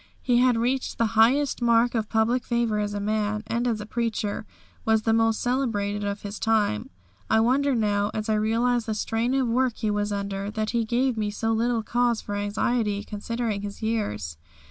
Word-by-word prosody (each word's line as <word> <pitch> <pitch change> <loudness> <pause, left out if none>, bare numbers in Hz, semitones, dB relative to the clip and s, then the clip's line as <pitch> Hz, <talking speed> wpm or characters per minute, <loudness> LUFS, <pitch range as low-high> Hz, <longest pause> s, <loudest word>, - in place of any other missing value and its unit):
He 245 -2 +3
had 250 -2 +4
reached 255 +3 -1
the 230 - +2
highest 250 +6 +3
mark 235 0 +3
of 220 -3 -1
public 230 +3 +1
favour 235 -3 0
as 205 0 -2
a - - -2
man, 210 +1 -1
and 235 +2 -1
as 225 -3 0
a 210 - -6
preacher 220 -2 -2 0.4
was 220 -1 +2
the 225 - +2
most 225 -1 +2
celebrated 210 -5 -1
of 200 0 -3
his 205 0 -6
time. 210 - +1 0.4
I 220 - +4
wonder 265 +4 +2
now, 205 -2 +1
as 215 0 -4
I 220 - +2
realise 230 +2 +1
the 220 - -2
strain 230 +4 -1
of 265 -2 +1
work 245 0 +1
he 215 - -1
was 205 0 -1
under, 200 0 -3
that 215 0 -2
he 230 -1 0
gave 245 +2 +1
me 210 -1 0
so 225 +2 -2
little 230 0 +1
cause 240 0 +1
for 205 - -6
anxiety 205 +1 0
considering 215 0 -3
his 205 +1 -7
years. 105 - -2
220 Hz, 195 wpm, -25 LUFS, 210-240 Hz, 0.4 s, had